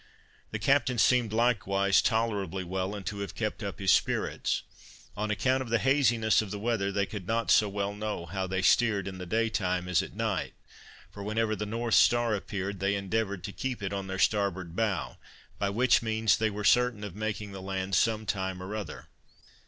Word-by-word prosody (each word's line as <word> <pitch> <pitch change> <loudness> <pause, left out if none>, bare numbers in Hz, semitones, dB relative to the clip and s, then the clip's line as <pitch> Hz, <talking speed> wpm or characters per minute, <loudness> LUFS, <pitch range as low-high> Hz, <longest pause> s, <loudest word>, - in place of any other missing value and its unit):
The - - -3
captain 135 -3 +2
seemed 120 -1 +3
likewise 100 -4 +2
tolerably 100 -5 0
well, 95 +2 -3
and 100 -2 -7
to 105 -3 -4
have 100 - -5
kept 110 0 -3
up 100 -2 -4
his 95 -1 +2
spirits. - - 0 0.5
On 105 +1 -2
account 130 +5 +1
of 130 - -5
the 115 - +3
haziness 120 -5 +3
of 110 - -6
the 105 - -4
weather, 105 -2 -1
they 100 0 0
could 95 -3 -7
not 115 -1 0
so 105 - +5
well 100 0 -2
know 105 -4 -4
how 95 +3 -3
they 95 0 -2
steered 105 -3 +3
in 95 -1 -6
the 90 - -6
day 115 +5 +1
time 90 -4 -1
as 90 -2 +3
at - - -8
night; - - -2 0.6
for, 100 - -9
whenever 110 +1 0
the 105 0 -4
North 115 +1 -2
star 120 -2 +4
appeared, 100 -1 -4
they 100 +2 +1
endeavored 100 -1 -2
to 100 - -5
keep 130 -5 -4
it 100 0 -2
on 100 -1 -3
their 95 0 -4
starboard 95 -4 0
bow, 105 -6 -1 0.4
by 100 - +1
which 120 +5 +3
means 110 -1 +2
they 110 0 +1
were 105 0 -5
certain 125 -2 +3
of 100 -4 -6
making 105 -1 -4
the 95 -1 -8
land 95 0 -4
some 110 0 +2
time 95 -2 -2
or 100 +3 -5
other. 105 -2 -6
105 Hz, 200 wpm, -29 LUFS, 95-110 Hz, 0.6 s, so